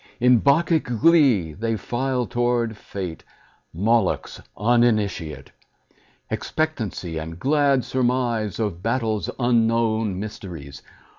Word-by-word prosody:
In 125 -1 +5
Bacchic 160 +4 +3
glee 125 - +3
they 115 +6 -2
file 125 +4 -2
toward 120 -2 0
Fate, 95 -5 -7 0.5
Moloch's 105 +3 0 0.2
uninitiate; 105 -7 +1 0.8
Expectancy, 110 - -3
and 80 +1 -7
glad 140 - +2
surmise 120 -5 0
Of 100 -6 -2
battle's 110 -4 -1
unknown 115 -4 +1
mysteries. 85 -9 -8
115 Hz, 90 wpm, -23 LUFS, 100-125 Hz, 0.8 s, In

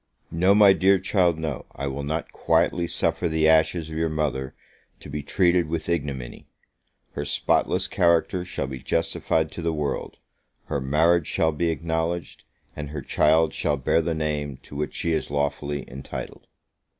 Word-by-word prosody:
No, 90 +4 +3
my 105 -2 +7
dear 95 +1 +4
child, 90 -3 +2
no; 80 -5 -4
I 70 - -4
will 70 +1 -3
not 75 +3 -3
quietly 85 +1 +1
suffer 85 - 0
the 80 0 +2
ashes 80 +1 +3
of 80 - -5
your 80 0 +1
mother 70 -4 -2 0.4
to 70 - -11
be 75 0 -3
treated 85 +2 +2
with 80 0 -3
ignominy! 70 -7 -3 0.6
her 70 - -4
spotless 70 - +1
character 85 +1 +2
shall 90 -5 -4
be 65 -1 -6
justified 80 +1 0
to - - -7
the 85 0 0
world 75 -3 -3 0.5
her 70 - -2
marriage 80 +4 +3
shall 80 - +1
be 85 +2 -1
acknowledged, 80 +1 -3 0.3
and 75 -1 -6
her 75 -2 -6
child 80 +4 +3
shall 75 -1 0
bear 75 +5 +2
the 80 0 -2
name 75 -3 -2
to - - -12
which 75 0 -3
she 85 - -1
is 80 - -1
lawfully 70 -1 -2
entitled. 65 +2 -8
80 Hz, 165 wpm, -24 LUFS, 70-85 Hz, 0.6 s, my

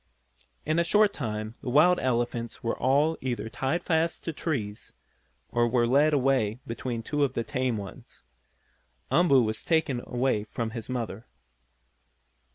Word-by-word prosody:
In 155 +2 +1
a - - +4
short 205 +4 +4
time 110 -4 -4
the - - -4
wild 165 +7 +5
elephants 120 -2 -2
were 115 - 0
all 145 +5 +2
either 120 -3 -3
tied 135 +9 -2
fast 165 0 0
to 165 - -3
trees, 115 -11 -4 0.6
or 120 0 +2
were 120 0 +2
led 140 +6 +4
away 130 -6 +2
between 115 0 -4
two 145 +4 0
of 135 -2 0
the 115 - 0
tame 130 -3 -1
ones. 100 -2 -10 0.9
Umboo 145 -7 +5
was 110 -1 -2
taken 160 -7 +1
away 120 -4 0
from 110 +1 -4
his 115 +1 -7
mother. 115 -3 -4
130 Hz, 150 wpm, -27 LUFS, 115-150 Hz, 0.9 s, wild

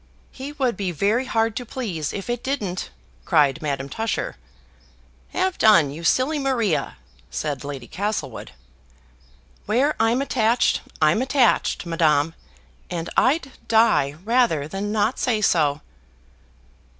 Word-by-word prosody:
"He 275 +2 -7
would 260 -6 0
be 190 -2 -2
very 205 - +1
hard 225 -3 0
to 250 - -3
please 205 - -4
if 195 - -6
it 240 0 -2
didn't," 210 -10 -3 0.3
cried 145 - +3
Madame 140 -3 -2
Tusher. 225 +10 -3 0.9
"Have 375 0 -1
done, 170 -10 +5
you 160 +4 -8
silly 260 - +2
Maria," 240 - 0 0.3
said 145 -4 -3
Lady 140 -3 -6
Castlewood. 190 - -4 1.2
"Where 260 +8 +2
I'm 225 +3 +3
attached, 240 -3 +2 0.2
I'm 155 +9 +4
attached, 260 -6 +2
Madame 165 -2 +2 0.6
and 170 -2 -4
I'd 275 0 +2 0.2
die 150 -12 +3
rather 220 - +2
than 195 +5 -4
not 215 +3 0
say 230 -4 +1
so." 150 -7 +2
210 Hz, 125 wpm, -23 LUFS, 155-245 Hz, 1.2 s, done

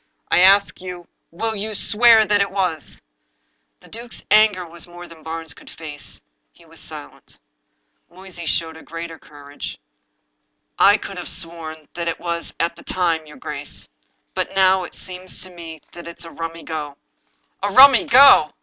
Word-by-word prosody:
I - - +5
ask 195 +1 +5
you, 180 -2 -8 0.2
will 220 +6 -3
you 215 +1 -3
swear 230 +3 +5
it 205 -2 +2
was?" 180 -6 -1 0.8
The - - -17
duke's 235 +1 -8
anger 210 -4 +5
was 170 +1 -8
more 175 0 -11
than 165 -2 -14
Barnes 160 -1 -6
could - - -15
face. 150 -3 -9 0.3
He - - -22
was - - -15
silent. - - -11 0.7
Moysey 175 -1 -9
showed 160 0 -1
a - - -11
larger 165 0 -8
courage. 145 -1 -9 0.5
" - - -34
I 205 - +3
could 195 -3 -8
have 175 - -6
sworn 165 -3 -7
that 170 -1 -4
it 165 - -2
was 170 -1 -4
at 170 0 0
the - - -15
time, 165 -4 -1
your 150 - -13
grace. - - -6 0.5
But - - -3
now 190 -1 +4
it - - -12
seems 185 0 -6
to 185 - -9
me 165 -3 -10
that 170 -1 -11
it's 170 0 -9
a 165 - -10
rummy 165 0 -6
go." 150 -3 -5 0.3
" - - -45
A 200 - 0
rummy 260 +3 +8
go! 255 - +7
170 Hz, 170 wpm, -21 LUFS, 160-195 Hz, 0.8 s, rummy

